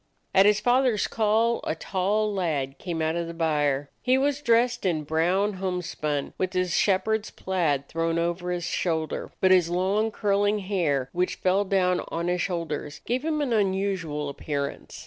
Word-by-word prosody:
At 195 +1 +6
his 210 0 +4
father's 245 -2 +2
call 225 +2 +1
a - - -2
tall 205 +5 0
lad 150 -8 -2
came 170 -3 -3
out 160 +1 0
of 170 -1 -2
the 170 - -7
byre. 145 -4 0
He 255 +1 +3
was 285 +1 0
dressed 240 0 +2
in 165 -5 0
brown 175 +7 +1
home 180 -2 -1
spun 150 -4 -3
with 185 0 -1
his 185 -2 0
shepherd's 215 +2 +1
plaid 155 -7 -1
thrown 165 0 -1
over 170 +1 -1
his 175 -1 -2
shoulder, 160 -3 -2
but 190 - +4
his 180 -3 +5
long 190 +5 +1
curling 205 -1 +1
hair, 165 -10 -1
which 180 +1 0
fell 190 +2 +1
down 185 -2 +2
on 170 +1 -2
his 180 0 0
shoulders, 165 -5 -3
gave 250 +3 -1
him 310 -1 0
an 265 -5 0
unusual 190 -7 0
appearance. 140 0 -5
185 Hz, 170 wpm, -26 LUFS, 165-210 Hz, -, At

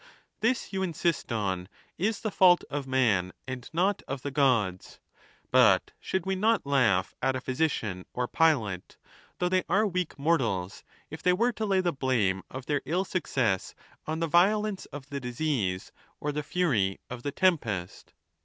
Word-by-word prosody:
XXXI. - - -26
This, 235 -1 0
you 190 - -1
insist 170 -5 -1
on 100 -5 -1
it, 90 - -15 0.4
is 220 -2 -2
the 215 - -2
fault 180 -2 +5
of 145 -2 -3
man, 110 -9 +2
and 130 -2 -6
not 185 +5 +1
of 135 -1 -5
the 145 - -3
Gods. 115 -10 +1 0.5
But - - +5
should 190 - -2
we 190 0 0
not 215 +1 +2
laugh 115 -10 +2
at 130 0 +1
a - - -1
physician 125 - -1
or 125 0 -2
pilot, 115 - +1 0.4
though 180 - +1
they 185 0 +2
are 200 +5 +3
weak 180 -4 -2
mortals, 115 - 0 0.3
if 160 - -7
they 180 - +3
were 235 +7 +2
to 220 -1 -3
lay 190 -1 +3
the 175 -2 0
blame 115 -9 +1
of 130 -1 -7
their 145 -2 0
ill 180 +5 0
success 125 - -1 0.3
on 160 +1 -2
the - - +2
violence 200 +4 +2
of 145 0 -10
the 140 - -3
disease 125 -7 -2 0.3
or 150 - -2
the 150 - -3
f 150 - -9
uiy 115 - +2
of 125 -1 -7
the 145 - -3
tempest 120 - -1
140 Hz, 180 wpm, -28 LUFS, 115-180 Hz, 0.5 s, fault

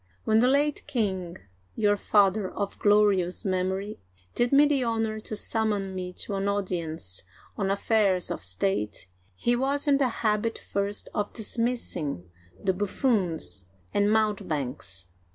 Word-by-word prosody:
When 220 0 +3
the 245 - +5
late 285 +2 +2
king 190 -10 -1 0.2
— 95 - -37
your 205 -1 +3
father 200 -1 +3
of 200 -1 -4
glorious 205 -4 +3
memory 190 +2 -1 0.2
— 90 0 -33
did 240 0 +1
me 285 +1 +7
the 285 -3 +2
honor 225 -2 -1
to 215 - -5
summon 210 -3 -1
me 180 -1 -4
to 200 - -2
an 195 0 -1
audience 170 - -2 0.3
on 195 -2 -1
affairs 200 -2 +2
of - - -3
state, 105 - -1 0.3
he 240 - +1
was 275 +4 0
in 280 -1 +4
the 265 -3 +3 0.2
habit 215 +1 +1
first 200 +1 -3
of 205 -1 -2
dismissing 220 - -2 0.3
the 190 - +1
buffoons 185 - 0 0.3
and 205 +1 +3
mountebanks 145 - 0
205 Hz, 145 wpm, -27 LUFS, 180-225 Hz, 0.3 s, me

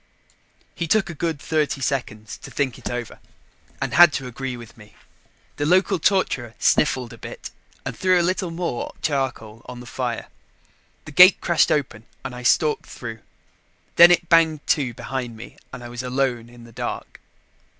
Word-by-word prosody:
He 170 - -3
took 195 +1 +2
a - - -7
good 165 -1 -2
thirty 150 -1 -1
seconds 110 -5 -3
to - - -10
think 135 -4 -2
it - - -5
over 120 -2 -5 0.6
and - - -3
had 175 -1 +8
to 135 - -3
agree 125 0 -5
with 115 -2 -12
me. 105 -1 -17 0.6
The 145 - -1
local 185 +2 +3
torturer 140 - 0
sniffled 130 -6 +1
a - - -13
bit - - -8 0.3
and - - -4
threw 185 -1 +3
a - - +2
little 185 0 -1
more 165 -6 -4
charcoal 130 -6 -2
on 125 0 -8
the 125 - -10
fire. - - -4 0.8
The 155 - -9
gate 180 +6 +8
crashed 170 -2 +2
open 125 -6 -2 0.2
and - - -5
I 125 - -8
stalked 150 +5 +2
through; 115 -2 -7 0.8
then 170 +1 +9
it 175 0 +3
banged 160 -3 +3
to 130 -6 +1
behind 125 -2 -5
me 115 - -11
and 125 -1 -9
I 120 - -8
was 120 0 -6
alone 125 -2 -1
in 120 0 -15
the 115 - -14
dark. - - -6
135 Hz, 175 wpm, -22 LUFS, 120-165 Hz, 0.8 s, then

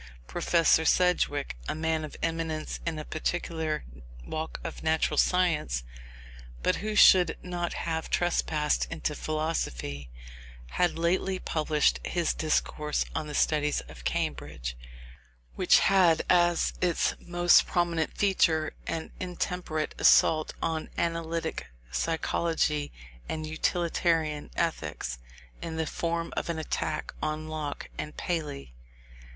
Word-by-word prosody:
Professor 165 - +3
Sedgwick, 155 - +2
a - - -1
man 160 0 0
of 155 - -7
eminence 165 -1 -2
in 165 -2 -1
a 155 - -5
particular 160 -1 -2 0.4
walk 160 0 -4
of - - -6
natural 160 0 +1
science, 155 - +2 0.8
but - - +2
who 215 +1 -3
should 185 -3 +7
not 175 -1 -3
have 160 -1 -3
trespassed 155 -3 +1
into 160 -1 -2
philosophy, 70 - -3 0.6
had 175 -2 +1
lately 185 +3 +1
published 155 -3 +1
his 175 -2 0
Discourse 150 -1 0
on 155 -1 -3
the 150 - -5
Studies 150 -1 +2
of - - -13
Cambridge, - - -3 0.8
which - - +5
had 180 -5 +4
as 175 -1 +3
its 175 -3 +2
most 175 0 +4
prominent 170 -2 0
feature 165 -6 +2
an 160 -1 -3
intemperate 180 -3 -3
assault 155 -1 +5
on 160 -1 -2
analytic 165 0 -2 0.2
psychology 160 - 0 0.4
and 155 0 -3
utilitarian 160 -1 0
ethics, 75 - -2 0.4
in 165 -1 -5
the 160 0 -1
form 170 +1 -2
of - - -2
an 170 - -1
attack 155 -1 -3
on 155 0 -2
Locke 155 -2 -4
and 150 - -5
Paley. 150 - -3
160 Hz, 115 wpm, -28 LUFS, 155-170 Hz, 0.8 s, should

